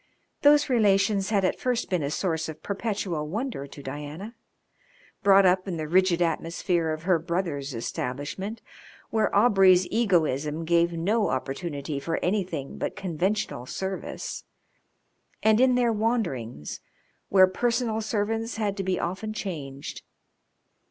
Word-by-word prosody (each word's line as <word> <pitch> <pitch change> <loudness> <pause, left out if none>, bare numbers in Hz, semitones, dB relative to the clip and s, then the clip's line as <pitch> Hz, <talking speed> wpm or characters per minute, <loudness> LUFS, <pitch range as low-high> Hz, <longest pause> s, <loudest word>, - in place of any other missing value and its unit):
Those 290 0 +6
relations 200 -5 +3
had 200 -3 +2
at - - 0
first 245 -2 0
been 180 -3 +1
a 140 - -1
source 160 0 -1
of 155 -1 -9
perpetual 195 -7 -2
wonder 215 - -3
to 140 0 -11
Diana, 150 - -6 0.9
brought 195 -1 +6
up 185 +1 +3
in 175 -3 -3
the 155 -1 -3
rigid 180 +1 +3
atmosphere 170 0 0
of 155 0 -4
her 180 -2 +3
brother's 160 -5 -3
establishment, 145 - -4 0.5
where 220 -1 +2
Aubrey's 195 -4 +6
egoism 165 - +1
gave 170 +1 +3
no 205 +6 +1
opportunity 140 +2 -3
for 165 +4 -2
anything 180 -7 -2
but - - -3
conventional 185 - -2
service, 190 +5 -5 1.0
and 220 +2 +5
in 255 -1 +5
their 240 -2 +2
wanderings, 175 - -2 0.5
where 190 -1 +7
personal 230 +3 0
servants 225 +1 -1
had 205 -3 -1
to 195 - -2
be 185 -1 0
often 195 +5 -3
changed. 145 -9 -6
185 Hz, 130 wpm, -26 LUFS, 155-215 Hz, 1.0 s, where